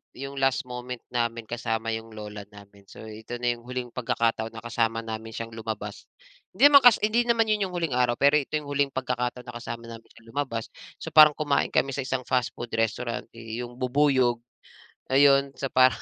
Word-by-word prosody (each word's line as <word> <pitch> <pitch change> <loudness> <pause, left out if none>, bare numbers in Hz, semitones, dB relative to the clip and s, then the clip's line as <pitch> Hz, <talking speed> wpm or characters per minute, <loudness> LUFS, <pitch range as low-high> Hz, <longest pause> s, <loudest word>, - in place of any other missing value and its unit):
yung 140 +1 -7
last 135 +2 +2
moment 125 0 -6
namin 115 -1 -1
kasama 115 -1 -2
yung 115 0 -8
lola 105 -1 -7
namin. 100 -1 -16
So, - - -12
ito 110 +2 -8
na 120 0 +1
yung 120 - -17
huling 125 -1 -5
pagkakataon 115 -2 -1
na 110 - -8
kasama 115 -1 -1
namin 110 0 -6
siyang 115 0 -5
lumabas. 110 -2 -6 0.5
Hindi 290 +1 +7
naman 280 - +10
kas 245 - +9
hindi 225 +3 +3
naman 230 -1 +3
yun 210 -2 +1
yung 180 - -8
huling 165 -4 -1
araw, 125 -1 +2
pero 140 +1 +5
ito 145 +1 -4
yung 150 - -11
huling 140 0 +2
pagkakataon 125 -1 -2
na - - -6
kasama 120 -1 -6
namin 115 -1 -11
siyang 115 - -19
lumabas. 115 -6 -3 0.3
So, - - -7
parang 150 -1 +8
kumain 145 -2 +1
kami 135 - +1
sa 140 - -2
isang 130 0 -2
fastfood 120 -1 -2
restaurant 115 +1 -2
yu 115 +1 -6
yung 120 - -14
bubuyog, 130 -2 +2 0.7
ayon. 140 0 +5
So 135 - -3
parang 130 0 +4
125 Hz, 195 wpm, -26 LUFS, 115-140 Hz, 0.7 s, naman